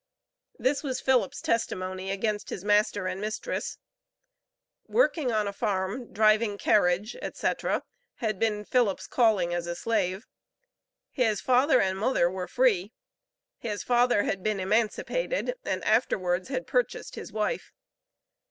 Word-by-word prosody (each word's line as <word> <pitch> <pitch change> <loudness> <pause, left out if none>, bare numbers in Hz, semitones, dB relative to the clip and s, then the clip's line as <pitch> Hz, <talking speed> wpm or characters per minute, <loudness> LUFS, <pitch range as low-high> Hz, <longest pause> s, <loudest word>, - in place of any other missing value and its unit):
This 275 +2 +1
was 260 -3 -3
Philip's 265 +1 +1
testimony 185 -4 -1
against 205 +2 -2
his 185 - -5
master 205 -1 +2
and 185 +1 -3
mistress. 215 - -3 1.1
Working 330 - +2
on 215 -2 +1
a 200 - -3
farm, 200 +5 -2
driving 215 0 +3
carriage, 200 +2 +2
etc., - - -1 0.3
had 215 -4 -2
been 210 -2 0
Philip's 235 -6 +1
calling 210 -8 +2
as 175 0 -2
a 175 - -3
slave. 190 0 -1 0.9
His 225 -5 +1
father 260 +4 +4
and 190 0 0
mother 205 -6 +2
were 185 -1 -4
free. 220 -6 +2 0.7
His 210 -3 -4
father 245 -3 +3
had 195 - -2
been 215 0 -1
emancipated, 230 - 0
and - - -2
afterwards 185 -5 +1
had 260 -1 -2
purchased - - -1
his - - -8
wife. - - -2
215 Hz, 130 wpm, -27 LUFS, 190-245 Hz, 1.1 s, father